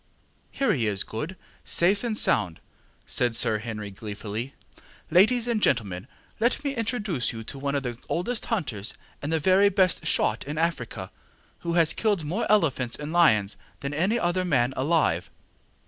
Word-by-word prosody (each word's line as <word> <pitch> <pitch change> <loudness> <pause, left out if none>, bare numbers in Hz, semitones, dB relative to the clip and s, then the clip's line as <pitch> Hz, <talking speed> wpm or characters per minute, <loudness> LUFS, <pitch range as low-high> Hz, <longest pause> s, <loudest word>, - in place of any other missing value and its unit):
ŌĆ£Here 275 - +2
he 115 -5 0
is, 100 -2 +2
Good, 150 +12 -5 0.3
safe 195 +5 +2
and 225 -3 -2
sound, 95 - +2
ŌĆØ - - -29 0.4
said 120 -2 +1
Sir 110 -1 +2
Henry, 105 -2 -6
gleefully. 105 +5 -6 0.6
ŌĆ£Ladies 225 +8 +4
and 230 -3 0
gentlemen, 100 - 0 0.3
let 235 +5 +1
me 280 -1 -1
introduce 210 - -1
you 115 -1 -7
to 135 - -6
one 140 +1 -1
of 140 - -1
the 120 -2 -5
oldest 215 +7 -1
hunters 125 - -2 0.3
and 145 - -3
the 165 - +2
very 190 +5 +4
best 185 -3 +2
shot - - +1
in 150 +2 -5
Africa, 130 - -2 0.5
who 170 - -3
has 165 -2 +4
killed 205 -7 0
more 185 +9 -1
elephants 135 - +2
and 150 +2 -6
lions 110 - +4 0.2
than 140 +1 -3
any 185 +10 +1
other 185 -3 0
man 130 -7 +1
alive. 135 - +1
150 Hz, 165 wpm, -26 LUFS, 115-190 Hz, 0.6 s, ŌĆ£Ladies